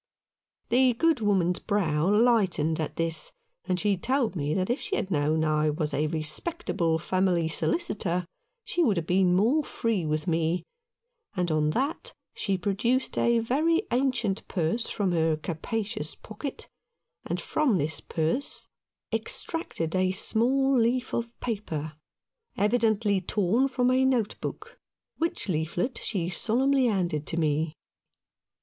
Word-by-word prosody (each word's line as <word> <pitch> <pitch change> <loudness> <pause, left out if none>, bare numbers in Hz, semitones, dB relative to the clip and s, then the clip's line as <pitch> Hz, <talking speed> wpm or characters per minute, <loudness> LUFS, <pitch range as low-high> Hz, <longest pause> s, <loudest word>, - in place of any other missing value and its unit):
The 255 +1 +4
good 325 +3 +2
woman's 190 -5 +1
brow 170 -5 +1
lightened 200 -8 +3
at 155 - -3
this, 165 -1 0 0.3
and 185 -1 0
she 205 0 +2
told 250 +2 0
me 145 -3 -1
that 185 +4 0
if 255 - -1
she 410 -1 -2
had 195 - -2
known 155 0 +1
I 155 0 +2
was 150 0 -1
a 150 +2 +1
respectable 160 - -1
family 180 0 +1
solicitor 170 +3 0 0.4
she 355 - 0
would 210 - +2
have 165 - -1
been 180 0 +3
more 240 +11 +3
free 225 - -1
with 155 0 -1
me, 165 +1 0 0.7
and 180 -3 0
on 155 -1 +2
that 280 +6 -2 0.2
she 195 -2 -1
produced 215 +7 0
a 235 0 +3
very 310 - +2
ancient 245 -5 0
purse 180 +6 -1
from 200 -4 0
her 160 -2 +2
capacious 195 +3 -4
pocket, 220 +6 -7 0.6
and - - -3
from 275 -10 +1
this 155 +1 -1
purse 165 - -2 0.5
extracted 185 - -2
a 185 0 +2
small 260 +6 +2
leaf 245 +2 +1
of 235 0 -3
paper, 160 -10 -3 0.6
evidently 210 -2 +2
torn 210 +7 +1
from 250 -1 +1
a 260 +1 +3
note 250 -5 +1
book, - - -7 0.4
which 330 -7 -1
leaflet 175 - -1
she 185 -6 -2
solemnly 255 +8 +2
handed 175 -8 -1
to 165 - -3
me. 155 0 0
195 Hz, 140 wpm, -27 LUFS, 165-240 Hz, 0.7 s, The